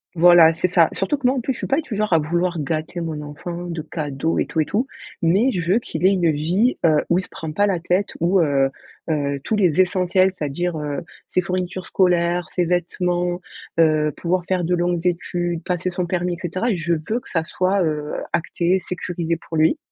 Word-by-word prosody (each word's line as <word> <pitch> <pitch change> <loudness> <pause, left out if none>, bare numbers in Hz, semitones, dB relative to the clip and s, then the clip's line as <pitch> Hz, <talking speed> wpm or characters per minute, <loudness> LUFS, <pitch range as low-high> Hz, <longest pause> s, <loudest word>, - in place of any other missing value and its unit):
Voilà. 170 -1 +7
C'est 170 +2 +1
ça. 170 -2 +4
Surtout 195 +10 -1
que 270 -3 +1
moi 260 - +2
en 255 - -1
plus, 265 +3 -1
je - - -10
suis - - -3
pas 275 - +2
du 275 -8 -6
genre 215 0 -1
à - - +6
vouloir 170 +3 -1
gâter 155 +4 -3
mon 160 -3 -4
enfant 170 +4 -6
de 170 -2 -4
cadeaux 150 0 -2
et - - 0
tout 160 - -2
et 155 - +3
tout. 230 - -1 0.3
Mais 195 +10 +3
je 175 -4 -1
veux 225 - +4
qu'il 160 -8 -6
ait - - +7
une 180 -4 +2
vie, 175 - +1
heu, 155 -2 +4
où 175 - +3
il - - 0
se - - -10
prend 160 -1 -6
pas 205 +7 +2
la 190 -4 0
tête 180 +4 0
où, 180 +3 +3
heu, 135 -3 +2 0.4
heu, 140 -2 0
tous 220 - 0
les 185 -6 +2
essentiels, 185 0 +2
c'est-à-dire, 160 +2 -2
heu, 150 -2 -3 0.3
ses 185 - +1
fournitures 185 0 -3
scolaires, 175 -2 +2
ses 180 - +2
vêtements, 175 0 0 0.4
heu, 155 -2 +3
pouvoir 175 0 -1
faire 185 -2 0
de 175 +2 0
longues 175 0 -1
études, 175 -1 -1
passer 180 +1 -2
son 175 0 -2
permis 180 0 -1
et 170 - -7
cetera, 185 +7 -1
je 170 -2 -1
veux 165 +9 -2
que - - -16
ça 165 -2 0
soit, 185 +3 0
heu, 150 -2 -2 0.2
acté, 175 +2 +1
sécurisé 175 -2 -3
pour 165 0 -6
lui. 155 - +3
175 Hz, 220 wpm, -21 LUFS, 160-185 Hz, 0.4 s, Voilà